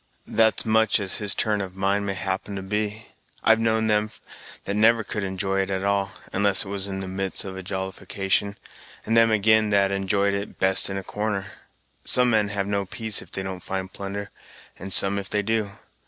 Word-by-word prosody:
"That's 110 Hz, +1 st, +2 dB
much 110 Hz, 0 st, +3 dB
as 100 Hz, -2 st, +2 dB
his 105 Hz, -1 st, 0 dB
turn 105 Hz, -2 st, +1 dB
of 95 Hz, -1 st, -6 dB
mind 100 Hz, +1 st, 0 dB
may 95 Hz, -, -2 dB
happen 95 Hz, +2 st, -3 dB
to 95 Hz, -, -5 dB
be. 105 Hz, +2 st, -3 dB, 0.3 s
I've 110 Hz, 0 st, +5 dB
known 110 Hz, 0 st, +1 dB
them 105 Hz, 0 st, +1 dB, 0.5 s
that 100 Hz, -, -3 dB
never 115 Hz, +2 st, +4 dB
could 105 Hz, -, -4 dB
enjoy 95 Hz, 0 st, -2 dB
it 95 Hz, -, -3 dB
at 95 Hz, -1 st, -2 dB
all, 100 Hz, -1 st, 0 dB, 0.2 s
unless 100 Hz, 0 st, +3 dB
it -, -, -8 dB
was 100 Hz, -1 st, -1 dB
in 95 Hz, -1 st, -4 dB
the 95 Hz, -, -5 dB
midst 95 Hz, 0 st, 0 dB
of 95 Hz, -1 st, -6 dB
a 95 Hz, -, -6 dB
jollification, 95 Hz, +1 st, -2 dB, 0.5 s
and 115 Hz, -, 0 dB
them 115 Hz, 0 st, +6 dB
again 110 Hz, 0 st, +3 dB
that 100 Hz, -1 st, +3 dB
enjoyed 100 Hz, +1 st, +1 dB
it 100 Hz, +1 st, -4 dB
best 95 Hz, +1 st, +2 dB
in 95 Hz, -, -3 dB
a 95 Hz, -, -4 dB
corner. 105 Hz, -1 st, -2 dB, 0.6 s
Some 125 Hz, -1 st, +5 dB
men 105 Hz, -2 st, +3 dB
have 100 Hz, -1 st, -2 dB
no 100 Hz, -1 st, -1 dB
peace 110 Hz, 0 st, -4 dB
if -, -, -15 dB
they 95 Hz, -, -4 dB
don't 95 Hz, -1 st, -5 dB
find 95 Hz, +1 st, -5 dB
plunder, 100 Hz, +1 st, -6 dB, 0.5 s
and 95 Hz, +2 st, -7 dB
some 100 Hz, +1 st, +5 dB
if 100 Hz, -, -7 dB
they 105 Hz, -1 st, 0 dB
do. 110 Hz, -1 st, 0 dB
100 Hz, 205 wpm, -24 LUFS, 95-105 Hz, 0.6 s, them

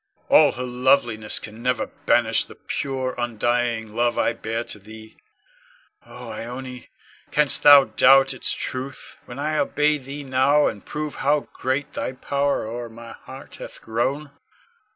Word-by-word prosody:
All -, -, +6 dB
her 125 Hz, -, -5 dB
loveliness 125 Hz, -3 st, +1 dB
can 110 Hz, +1 st, -8 dB
never 125 Hz, +1 st, 0 dB
banish -, -, +1 dB
the -, -, -14 dB
pure, 130 Hz, -2 st, -3 dB
undying 120 Hz, -1 st, -1 dB
love 120 Hz, 0 st, +1 dB
I -, -, +1 dB
bear 115 Hz, +1 st, -4 dB
to 105 Hz, -, -4 dB
thee. 110 Hz, +2 st, -13 dB, 0.9 s
Oh, 125 Hz, -2 st, -10 dB
Ione, 125 Hz, +1 st, -7 dB, 0.4 s
canst 150 Hz, -2 st, +3 dB
thou 145 Hz, -1 st, +9 dB
doubt 135 Hz, 0 st, +5 dB
its 130 Hz, -, -1 dB
truth, 130 Hz, +1 st, -5 dB
when 125 Hz, -, -10 dB
I 155 Hz, +2 st, -1 dB
obey 150 Hz, 0 st, +1 dB
thee 140 Hz, +2 st, -8 dB
now 135 Hz, +3 st, +3 dB
and 105 Hz, -2 st, -3 dB
prove 150 Hz, 0 st, -5 dB
how 145 Hz, +2 st, +2 dB
great 140 Hz, +3 st, -2 dB
thy -, -, -4 dB
power 140 Hz, 0 st, -1 dB
o'er 120 Hz, +1 st, -6 dB
my 115 Hz, +1 st, -11 dB
heart -, -, -12 dB
hath -, -, -10 dB
grown? 135 Hz, +6 st, -2 dB
125 Hz, 150 wpm, -23 LUFS, 115-140 Hz, 0.9 s, thou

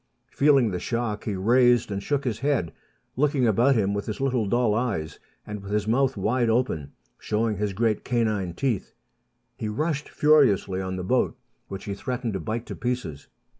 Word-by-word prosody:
Feeling 140 Hz, -6 st, +4 dB
the 90 Hz, -, -2 dB
shock, 115 Hz, -2 st, -3 dB
he 105 Hz, -, -2 dB
raised 120 Hz, +3 st, +3 dB
and 100 Hz, 0 st, -2 dB
shook 140 Hz, +5 st, -1 dB
his 115 Hz, -4 st, -2 dB
head, 135 Hz, -, 0 dB, 0.4 s
looking 140 Hz, -1 st, +2 dB
about 120 Hz, +5 st, +4 dB
him 100 Hz, -3 st, +1 dB
with 100 Hz, 0 st, -3 dB
his 110 Hz, -, -4 dB
little 130 Hz, -5 st, 0 dB
dull 120 Hz, 0 st, +2 dB
eyes, 100 Hz, -, -2 dB, 0.3 s
and 105 Hz, -1 st, -6 dB
with 100 Hz, 0 st, -9 dB
his 105 Hz, 0 st, 0 dB
mouth 130 Hz, +2 st, +2 dB
wide 115 Hz, +4 st, +1 dB
open, 110 Hz, -, 0 dB, 0.3 s
showing 110 Hz, 0 st, -1 dB
his 105 Hz, -1 st, -1 dB
great 110 Hz, +1 st, 0 dB
canine 110 Hz, -7 st, -1 dB
teeth. 120 Hz, -6 st, -2 dB, 0.6 s
He 110 Hz, -, -3 dB
rushed 150 Hz, +6 st, -2 dB
furiously 125 Hz, -11 st, +3 dB
on 95 Hz, 0 st, -3 dB
the 90 Hz, -, -4 dB
boat, 125 Hz, +7 st, +1 dB, 0.3 s
which 100 Hz, 0 st, -7 dB
he 100 Hz, -, -3 dB
threatened 125 Hz, +2 st, -3 dB
to 95 Hz, -, -2 dB
bite 110 Hz, +7 st, -4 dB
to -, -, -7 dB
pieces. 120 Hz, -, -4 dB
110 Hz, 180 wpm, -25 LUFS, 100-125 Hz, 0.6 s, Feeling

